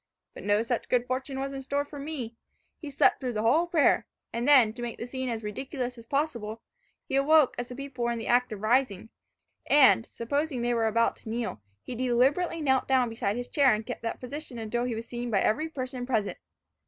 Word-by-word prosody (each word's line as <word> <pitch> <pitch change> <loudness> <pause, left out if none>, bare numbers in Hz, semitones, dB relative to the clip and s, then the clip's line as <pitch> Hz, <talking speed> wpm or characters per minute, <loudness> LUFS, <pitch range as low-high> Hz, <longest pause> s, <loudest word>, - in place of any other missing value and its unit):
But - - -10
no 205 +2 +2
such 235 0 -2
good 245 -1 +2
fortune 265 +2 -3
was 275 +1 -3
in 270 - -5
store 285 +2 -1
for 290 0 -9
me. 275 -6 -5 0.4
He 305 - -7
slept 280 - +3
through 255 -3 -3
the 215 0 -1
whole 310 +10 +3
prayer; 330 -4 +3 0.3
and 235 +3 -2
then, 255 -7 +6
to 240 - -9
make 240 -1 -4
the - - -5
scene 260 +1 -4
as 225 -2 -3
ridiculous 250 +4 -4
as 230 -1 -13
possible, 235 -7 -2 0.4
he - - -2
awoke 290 0 +5
as 245 +1 -4
the 250 - -7
people 270 -3 -4
were 235 - +1
in 235 - -2
the 225 - -5
act 245 0 +2
of 210 -1 -6
rising, 225 -3 +1 0.6
and, 270 -5 +6
supposing 280 +2 -2
they 240 0 +1
were 225 -1 +2
about 230 +1 +1
to - - -11
kneel, 225 - -3 0.2
he - - -6
deliberately 260 +8 +1
knelt 265 -2 +2
down 255 -3 +3
beside 210 -2 -2
his 245 0 -4
chair, 275 -6 +4
and 215 +1 -6
kept 245 - -6
that 230 - -4
position 265 0 -7
until 235 +2 -2
he 245 -2 -2
was 225 +1 -5
seen 240 0 -4
by 205 -4 +2
every 310 +9 +1
person 255 -4 -5
present. 220 -6 -1
245 Hz, 225 wpm, -28 LUFS, 230-275 Hz, 0.6 s, then